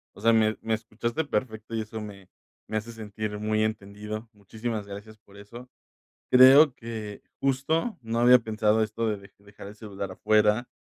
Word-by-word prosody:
O - - -13
sea, 115 +1 +4
me 110 -1 +2
me 110 - -1
escuchaste 115 +6 -4
perfecto 110 -3 -3
y 110 - -1
eso 110 +1 -7
me 100 -3 -10 0.4
me 110 - -2
hace 110 +2 -5
sentir 110 -1 -6
muy 110 0 0
entendido. 105 +1 -5
Muchísimas 105 +1 -5
gracias 105 +2 -10
por 100 -1 -20
eso. 120 +5 -12 0.6
Creo 130 +2 +8
que 110 -3 -7 0.2
justo 140 - 0
no 115 0 -2
había 125 +1 +7
pensado 110 -1 +1
esto 110 +1 -3
de 105 -1 -1
de 100 0 -16
dejar 100 0 -13
el 105 - -11
celular 100 -3 -7
afuera 105 +4 +2
110 Hz, 170 wpm, -26 LUFS, 105-115 Hz, 0.6 s, Creo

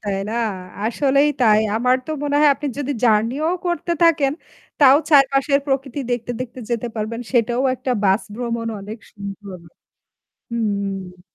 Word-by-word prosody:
তাই 200 -1 -1
না? - - -3 0.5
আসলেই 275 +4 +2
তাই। 215 -3 +5 0.2
আমার 250 +3 +3
তো - - -5
মনে 290 0 0
হয় 300 - +6
আপনি 295 - -6
যদি 285 0 -2
জার্নি 225 +2 +3
ও - - +1 0.2
করতে 345 0 -1
থাকেন 300 -5 +4 0.5
তাও 275 -2 +7
চারপাশের 275 0 +4
প্রকৃতি 270 0 -2
দেখতে, 245 -1 -2
দেখতে 255 0 -6
যেতে 235 0 -1
পারবেন। 220 +2 -3
সেটাও 240 0 +2
একটা 255 +1 -4
বাস 195 +2 +3
ভ্রমণ 235 -1 -3
অনেক 210 +3 -8
সুন্দর। 200 -1 -8 0.9
হুম। 200 -5 -3
240 Hz, 150 wpm, -20 LUFS, 215-275 Hz, 0.9 s, তাও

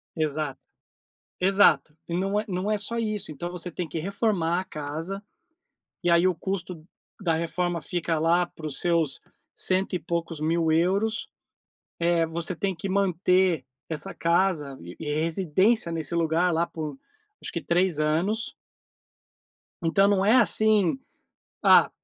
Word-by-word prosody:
Exato. 155 -1 -2 0.8
Exato, 190 -5 +4
e 170 - -4
não 195 +3 0
é 215 - -1
não 190 +2 -2
é 215 - +2
só 230 +3 -2
isso. 215 -7 -2
Então, 175 +5 -5
você 180 0 -5
tem 170 0 -4
que 165 - -4
reformar 185 -2 0
a - - -6
casa, 160 +6 -5 0.8
e 175 - +3
aí 170 +2 +5
o 180 - +1
custo 175 -2 -4 0.3
da 170 -5 +1
reforma 170 +1 -1
fica 165 -1 -1
lá 170 +2 +3
para 155 -2 -8
os 140 - -2
seus 165 -6 +1 0.3
cento 190 +1 0
e 180 - 0
poucos 165 0 -3
mil 160 +1 +1
euros. 195 +7 +1 0.7
Eh, 170 -1 +2
você 170 +2 -3
tem 190 +2 -2
que 180 +4 -5
manter 185 -4 +2 0.2
essa 165 +4 -4
casa 170 -5 +1
e 85 +1 -10
e 150 -2 -3
residência 170 +5 +1
nesse 165 -1 -3
lugar 170 +1 +2
lá 170 +1 +1
por, 155 -4 -6 0.5
acho - - -5
que 170 - -2
3 170 +1 +1
anos. 175 +9 0 1.3
Então 195 +4 +3
não 195 -1 +2
é 220 +5 +5
assim: 215 -2 +4 0.6
"Ah, - - +7
170 Hz, 150 wpm, -26 LUFS, 160-195 Hz, 1.3 s, Ah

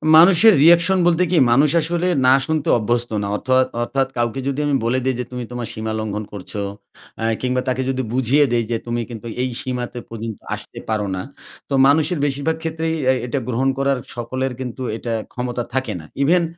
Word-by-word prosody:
মানুষের 185 +6 +7
রিয়েকশন 170 +3 +6
বলতে 175 +1 +3
কি? 180 - +3
মানুষ 140 +5 +5
আসলে 175 +3 -1 0.2
'না' 130 +1 +6
শুনতে 155 -2 -1
অভ্যস্ত 120 +1 -1
না। 100 - -2
অথোয়াত 130 +2 +2 0.2
অর্থাৎ 135 +2 0
কাউকে 120 +2 -1
যদি 140 +1 -1
আমি 145 - +2
বলে 130 +3 +2
দেই 130 -1 +1
যে 125 - -2
তুমি 125 -1 -4
তোমার 120 -1 -4
সীমা 110 0 -4
লঙ্ঘন 105 0 -3
করছো, 100 +1 -6 0.6
অ্যা 115 - -1
কিংবা 125 0 0
তাকে 130 0 0
যদি 130 0 -1
বুঝিয়ে 130 +3 +3
দেই 120 -1 +2
যে 115 - +1
তুমি 120 0 -1
কিন্তু 115 -1 -8 0.2
এই 130 - -1
সীমাতে 125 -1 -4
পর্যন্ত 115 -1 -6 0.2
আসতে - - -9
পারো 105 -2 0
না, 90 - -3 0.5
তো - - -3
মানুষের 155 +3 +2
বেশিরভাগ 145 +3 -1
ক্ষেত্রেই 160 0 -2 0.2
এই 130 - 0
এটা 125 +3 -2
গ্রহণ 125 +2 +1
করার 135 -1 +1 0.2
সকলের 130 +2 -3
কিন্তু 130 0 -6 0.2
এটা 115 -1 -4 0.2
ক্ষমতা 125 -1 -3
থাকে 130 0 -1
না। 80 - -11 0.2
ইভেন 175 +4 +4
130 Hz, 190 wpm, -20 LUFS, 120-150 Hz, 0.6 s, মানুষের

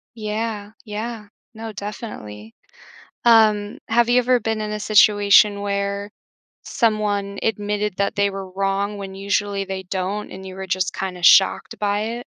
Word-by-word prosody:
Yeah, 215 -1 -4
yeah, 215 0 -6 0.3
no, 220 0 -7
definitely. 115 - -8 0.7
Um, 215 -3 +4
have 235 +1 +3
you 245 +1 +4
ever 250 0 +2
been 220 0 -2
in 210 0 -3
a 210 - -4
situation 205 -1 +5
where, 200 0 -2 0.5
someone 205 -4 -1
admitted 210 -2 -1
that 200 +2 0
they 200 -1 +2
were 195 -1 -7
wrong 195 +2 -1
when 195 -1 -7
usually 200 0 -1
they 190 0 -5
don't 190 +3 -3
and 190 +1 -9
you 190 - -8
were 190 0 -7
just 185 0 -1
kinda 180 -2 -5
shocked 190 +2 +4
by 205 0 0
it? 235 +3 -4
205 Hz, 150 wpm, -21 LUFS, 195-215 Hz, 0.7 s, situation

